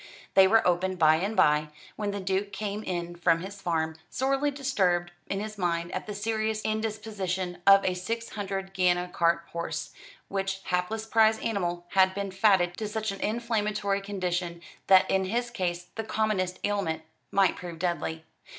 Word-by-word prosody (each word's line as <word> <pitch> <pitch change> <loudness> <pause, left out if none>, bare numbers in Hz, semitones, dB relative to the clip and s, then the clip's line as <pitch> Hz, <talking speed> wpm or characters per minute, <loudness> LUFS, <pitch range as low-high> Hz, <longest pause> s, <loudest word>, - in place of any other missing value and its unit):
They 190 -1 +7
were 225 +1 +4
opened 185 +1 +1
by 155 -1 +5
and 200 +6 -2
by, 150 0 +4 0.3
when 210 -1 -2
the 200 0 -3
Duke 195 +1 -1
came 205 +1 -3
in 175 -3 -3
from 170 -1 +2
his 195 +2 -8
farm, 160 -3 -1
sorely 275 +2 +1
disturbed 195 -11 0 0.2
in 195 - -2
his 215 0 -6
mind 170 -1 -1
at 185 - -4
the 210 - -5
serious 220 +1 -1
indisposition 210 -5 -2
of 195 0 +8
a 185 - +2
six 225 +6 -4
hundred 195 -2 -4
guinea 180 -1 +2
cart 170 0 +2
horse, 165 -1 -4 0.4
which 195 0 -2
hapless 185 +5 -1
prize 220 0 +4
animal 175 -6 -2
had 190 0 +4
been 200 -1 -3
fatted 190 -3 +3
to 215 - -3
such 215 0 -2
an 195 - -7
inflammatory 210 -3 0
condition 180 -3 -3 0.3
that 190 -1 +7
in 190 0 +1
his 235 +5 -1
case 175 -5 -3
the 225 - -4
commonest 215 -4 0
ailment 185 -6 -1 0.3
might 195 -2 +3
prove 175 -2 -7
deadly. 165 -2 -2
195 Hz, 170 wpm, -28 LUFS, 175-215 Hz, 0.4 s, of